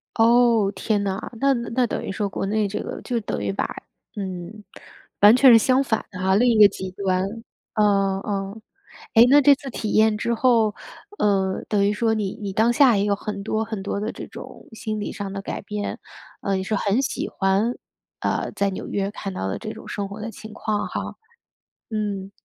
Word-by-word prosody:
哦， 230 -3 +4
天 210 -2 0
哪。 195 +3 -3
那 275 +2 +3
那 235 0 0
等 - - -3
于 - - -4
说 205 +1 -2
国 195 - -4
内 210 +1 0
这 200 - -4
个 - - -6
就 245 -2 -2
等 205 - -4
于 100 -1 -1
把 - - -1 0.5
嗯， 190 +1 -6 0.6
完 205 +3 +8
全 255 0 +7
是 - - +9
相 255 +4 +3
反 220 -4 -1
的 185 - -8
哈， 190 +1 +2
另 245 +4 +4
一 225 - +2
个 210 - +10
极 190 -1 -7
端 185 -1 0 0.5
嗯， 195 -2 +2
嗯。 200 +1 -4 0.5
诶， 230 +1 +8
那 290 +2 +7
这 285 0 +6
次 270 - -9
体 220 -3 -4
验 215 -1 +4
之 235 +2 -1
后， 230 -3 +3 0.4
呃， 195 -2 +1
等 205 -2 +2
于 205 - +1
说 225 +1 +1
你 210 -3 -2
你 200 -1 -3
当 220 +4 +3
下 250 -5 +5
也 200 - +1
有 205 - +2
很 200 0 -5
多 220 +2 -1
很 220 -3 -5
多 200 +1 -3
的 215 - -2
这 - - -8
种 - - -11
心 215 -1 -4
理 205 - -4
上 200 -1 -5
的 195 - -5
改 - - -5
变， 205 0 -4 0.4
呃， 195 -1 0
你 190 - -1
说 210 +2 -1
很 205 +6 +1
喜 275 - -3
欢， 195 +5 +1 0.5
呃， - - -1
在 200 0 0
纽 190 - -6
约 200 -1 -1
看 200 -2 -6
到 95 - -3
的 95 - -3
这 215 - -6
种 - - -11
生 200 -1 -3
活 200 +2 -8
的 225 - -4
情 220 0 -11
况 210 -1 -2
哈， - - -5 0.7
嗯。 205 -3 -3
210 Hz, 225 characters per minute, -23 LUFS, 195-225 Hz, 0.7 s, 个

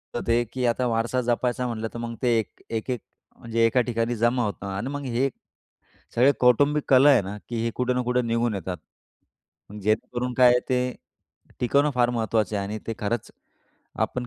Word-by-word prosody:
तर - - -1
ते 120 +1 +3
की 125 +3 -5
आता 120 +1 +1
वारसा 115 +2 0
जपायचा 120 +1 0
म्हटलं 115 -1 -3
तर 120 - -6
मग 115 0 -5
ते 120 -2 +3
एक 110 - -7
एक-एक 115 +1 -2 0.4
म्हणजे 115 0 0
एका 120 +2 +3
ठिकाणी 115 +1 0
जमा 120 +2 +2
होतं 100 -1 -5
आणि 100 +6 -3
मग 145 0 -4
हे 130 +3 +2
एक 135 - -2 0.8
सगळे 130 +4 +5
कौटुंबिक 140 +4 +4
कलह 135 +2 +7
आहे 125 -7 +5
ना, 100 +2 -6
की 115 -1 -2
हे 115 - 0
कुठे 125 0 0
ना 125 - 0
कुठे 125 0 +2
निघून 115 -1 +1
येतात. 95 -1 -4 1.1
जेणेकरून 120 +4 -1
काय 125 -1 +6
आहे 125 - +3
ते 125 -1 +2 0.8
टिकवणं 140 +4 +3
फार 120 -1 +3
महत्त्वाचं 110 -3 0
आहे 100 - -2
आणि 105 +2 -4
ते 115 - -3
खरंच 105 +2 -2 0.8
आपण 125 -1 -5
120 Hz, 190 wpm, -25 LUFS, 115-125 Hz, 1.1 s, कलह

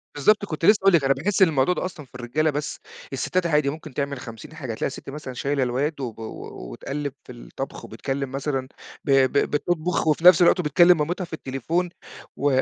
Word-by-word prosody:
بالضبط، 205 +8 +3
كنت 165 -2 -3
لسّه 210 - +7
هاقول 195 -1 +5
لِك. 160 -4 +5
أنا 135 - +4
باحِس 180 +9 -1
إن 190 - +8
الموضوع 150 +2 +2
ده 180 - -3
أصلًا 175 -5 -7
في 125 - -21
الرجالة 125 +6 0
بس، 145 0 -3 0.3
السِتّات 180 -1 0
عادي 150 -3 +2
ممكن 155 -1 -8
تعمل 140 -1 -2
50 120 +3 -10
حاجة. 130 -8 -5
تلاقي - - -2
السِت 135 - -8
مثلًا 140 -2 -7
شايله 140 +2 0
الواد 135 +4 -1
و 120 -3 -4
و 115 - -7
و - - -8
وتقلِّب 140 - -4
في - - -11
الطَبْخ 125 +2 -7
وبتكلّم 135 -1 -4
مثلًا 135 -1 -2 0.4
ب 140 - 0
ب - - -3 0.2
بتطبُخ 165 +2 0
وفي 155 +2 +2
نفس 180 -1 +9
الوقت 175 +1 +5
وبتكلّم 175 +2 +5
مامتها 175 +5 -1
في 170 - -15
التليفون 160 +5 -2 0.5
و 135 -2 +2
145 Hz, 210 wpm, -24 LUFS, 135-170 Hz, 0.5 s, نفس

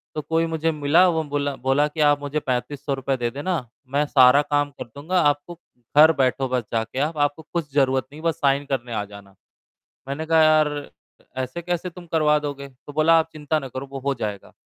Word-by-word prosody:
तो 155 - -2
कोई 165 +2 0
मुझे 165 0 -1
मिला 155 +4 +4
वो 160 -2 0
बोला 145 -1 -2
बोला 135 +3 +1
कि 150 +2 -10
आप 145 -1 +4
मुझे 145 +1 -2
3500 140 +1 -3
रुपए 135 0 -2
दे 120 -1 -1
देना, 145 -1 -3 0.2
मैं 140 +3 0
सारा 135 -1 +6
काम 145 0 0
कर 140 - -8
दूँगा। 165 +6 -1
आपको 145 +3 0 0.4
घर 155 +2 +8
बैठो 135 -1 +1
बस 125 -1 0
जाके 115 +3 -2
आप, 155 +3 -1
आपको 145 +1 0
कुछ 165 -4 -3
ज़रूरत 135 -2 +2
नहीं, 150 +2 -11
बस 165 -1 0
साइन 140 -2 +1
करने 125 -4 -3
आ 105 -2 -1
जाना। 100 -1 -14 0.7
मैंने 145 +3 -4
कहा 160 0 +4
यार 155 -1 +5 0.5
अ, - - -26
ऐसे 130 +6 -4
कैसे 175 +1 -3
तुम 175 0 -12
करवा 155 -2 +2
दोगे? 140 -1 -6
तो 135 +2 -14
बोला, 160 +2 +4
आप 160 0 0
चिंता 155 0 -1
ना 135 -3 -6
करो, 130 +2 -6
वो 135 - -4
हो 140 +1 -1
जाएगा। 105 -5 -6
145 Hz, 215 wpm, -23 LUFS, 135-155 Hz, 0.7 s, घर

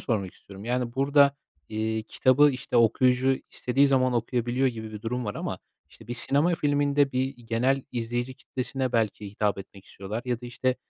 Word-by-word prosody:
sormak 100 -6 -2
istiyorum, 100 +1 -12
yani, 125 0 -1
burada, 140 +1 +4 0.3
iii, 110 0 -2
kitabı, 135 +5 +4
işte, 125 -2 -3
okuyucu 125 +3 +3
istediği 135 +3 +2
zaman 130 -2 +3
okuyabiliyor 120 +2 0
gibi 110 -3 -4
bir 105 - -8
durum 125 +2 -2
var 105 - -3
ama, - - -4 0.3
işte, - - -16
bir 120 - -3
sinema 145 +8 +1
filminde, 145 -3 +2
bir 130 +1 +1
genel 125 +3 0
izleyici 120 +2 -3
kitlesine 130 0 -4
belki 105 -3 -1
hitap 105 0 0
etmek 95 0 -11
istiyorlar 105 +4 -6
ya 120 -1 -2
da, 120 - -8
işte, 125 +1 -1
125 Hz, 170 wpm, -26 LUFS, 115-135 Hz, 0.3 s, burada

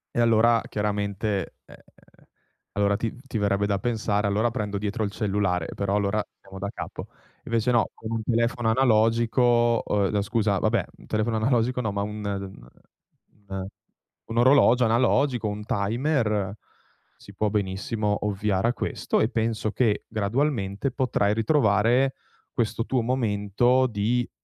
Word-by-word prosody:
E - - 0
allora, 115 0 +4
chiaramente 105 -1 -2
ehm, - - -14 1.0
allora, 100 0 +1
ti 115 0 -3
ti 115 - -3
verrebbe 100 -1 +1
da 100 -1 0
pensare: 105 -2 0
"Allora, 110 +3 +1
prendo 105 -2 -3
dietro 105 +2 -2
il 100 - -4
cellulare", 95 -5 -1
però, 100 0 -1
allora, 105 +1 +1 0.2
siamo 95 0 -11
da 100 - -3
capo. - - -7 0.4
Invece 115 +1 +1
no, 120 -2 +2
con 110 - -8
un 115 -1 -1
telefono 115 0 0
analogico 120 0 +3
uhm, 100 -2 +1
n - - +2
scusa, 105 -2 0
vabbè, 110 +2 +1 0.2
telefono 110 +1 0
analogico, 125 +2 +1
no, 110 -4 -2
ma 100 - -1
un 105 +1 -5
uhm, 95 -10 -5 0.8
un 95 0 -5 0.6
un 115 - -3
orologio 125 -1 +5
analogico, 120 +1 +2
un 105 0 -4
timer 105 -2 0 0.6
si 100 - -14
può 105 +2 0
benissimo 105 +1 -1
ovviare 100 0 0
a 120 - 0
questo, - - -2
e 110 - +2
penso 110 -2 -1
che, 110 -3 0
gradualmente, 110 +1 -1
potrai 120 -6 +1
ritrovare 115 +1 +2 0.4
questo 115 -1 -1
tuo 130 -2 0
momento 120 +1 +1
di, 120 +3 -1
110 Hz, 140 wpm, -25 LUFS, 100-120 Hz, 1.0 s, orologio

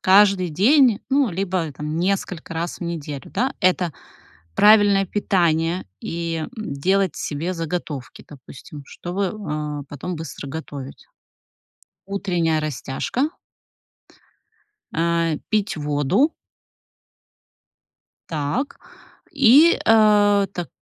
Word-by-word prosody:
каждый 195 -1 +5
день, 230 - +4
ну, 275 -3 +2
либо 180 -3 -2
там 150 +2 -5
несколько 180 -2 -2
раз 165 +1 -3
в - - -8
неделю, 150 -6 -5
да. 255 +7 -1
Это 180 -3 +2 0.6
правильное 205 - +5
питание 175 -3 0
и, 165 0 -3 0.2
м, 215 -8 -5
делать 190 +5 +1
себе 160 +5 -3
заготовки, 165 -5 -5
допустим, 145 +1 -12
чтобы, 185 +6 -3
а, 150 -8 -4
потом 150 +5 -5
быстро 155 -2 -7
готовить. 140 -2 -8 1.0
Утренняя 175 -5 0
растяжка. 155 - -2 1.6
А, 165 -1 +1
пить 215 -4 0
воду. 150 - +1 2.0
Так, 160 - -2 0.5
и, 285 +4 +6
а, 210 -2 +5
так 175 -3 -5
175 Hz, 95 wpm, -22 LUFS, 155-205 Hz, 2.0 s, и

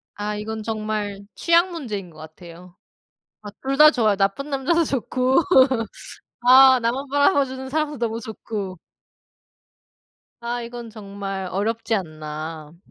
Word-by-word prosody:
아 210 +1 -3
이건 215 +1 -5
정말 215 -2 -4
취향 340 +2 +3
문제인 215 - -5
것 155 - -18
같아요. 170 +3 -13 0.7
아 210 - -8
2 270 +1 -2
다 305 +1 +8
좋아요 220 -7 +2
나쁜 200 +9 -1
남자도 280 +5 +1
좋고 260 -2 0 1.1
아 260 +1 +8
나만 255 +5 -2
바라봐 285 +1 +3
주는 265 0 -7
사람도 300 -1 -2
너무 230 -1 -2
좋고. 210 -3 -6 1.6
아 240 +1 -3
이건 235 0 -8
정말 200 -2 -6
어렵지 225 +3 -1
않나. 155 -2 -6
220 Hz, 235 characters per minute, -22 LUFS, 195-265 Hz, 1.6 s, 다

